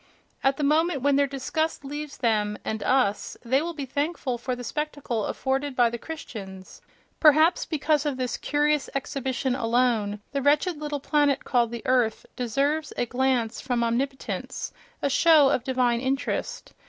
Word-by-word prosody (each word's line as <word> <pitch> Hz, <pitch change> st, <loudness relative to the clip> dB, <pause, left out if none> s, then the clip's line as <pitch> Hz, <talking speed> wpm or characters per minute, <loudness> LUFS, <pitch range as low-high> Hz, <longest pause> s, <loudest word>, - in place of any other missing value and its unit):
At 270 Hz, 0 st, +2 dB
the 295 Hz, -, -2 dB
moment 305 Hz, -1 st, +2 dB
when 285 Hz, -1 st, +4 dB
their 280 Hz, 0 st, +3 dB
disgust 280 Hz, +3 st, -2 dB
leaves 295 Hz, +1 st, -6 dB
them 210 Hz, -3 st, +1 dB
(—and 220 Hz, -1 st, -3 dB
us!) 215 Hz, -4 st, +1 dB
they 260 Hz, +4 st, +2 dB
will 335 Hz, +1 st, -4 dB
be 285 Hz, -3 st, -4 dB
thankful 285 Hz, -2 st, -2 dB
for 250 Hz, +1 st, -2 dB
the 245 Hz, -, -8 dB
spectacle 285 Hz, -6 st, -3 dB
afforded 270 Hz, +1 st, -2 dB
by 240 Hz, -2 st, +4 dB
the 235 Hz, -, -5 dB
Christians: 195 Hz, -12 st, -9 dB, 0.4 s
perhaps 310 Hz, +2 st, +5 dB
because 300 Hz, -1 st, +1 dB
of 290 Hz, -4 st, -2 dB
this 255 Hz, -1 st, -2 dB
curious 295 Hz, -1 st, +1 dB
exhibition 265 Hz, -1 st, -2 dB
alone 230 Hz, -4 st, +1 dB
the 280 Hz, 0 st, -1 dB
wretched 295 Hz, +4 st, +2 dB
little 295 Hz, -1 st, -3 dB
planet 290 Hz, -1 st, +2 dB
called 240 Hz, -2 st, +2 dB
the 235 Hz, +1 st, -7 dB
earth 250 Hz, -4 st, +1 dB
deserves 280 Hz, +5 st, 0 dB
a -, -, +1 dB
glance 245 Hz, -2 st, 0 dB
from 245 Hz, -3 st, 0 dB
omnipotence, 265 Hz, +4 st, -3 dB, 0.3 s
a -, -, +3 dB
show 300 Hz, -1 st, +6 dB
of 250 Hz, -, 0 dB
divine 250 Hz, -2 st, +1 dB
interest.... 270 Hz, +1 st, -2 dB
270 Hz, 160 wpm, -26 LUFS, 245-295 Hz, 0.4 s, show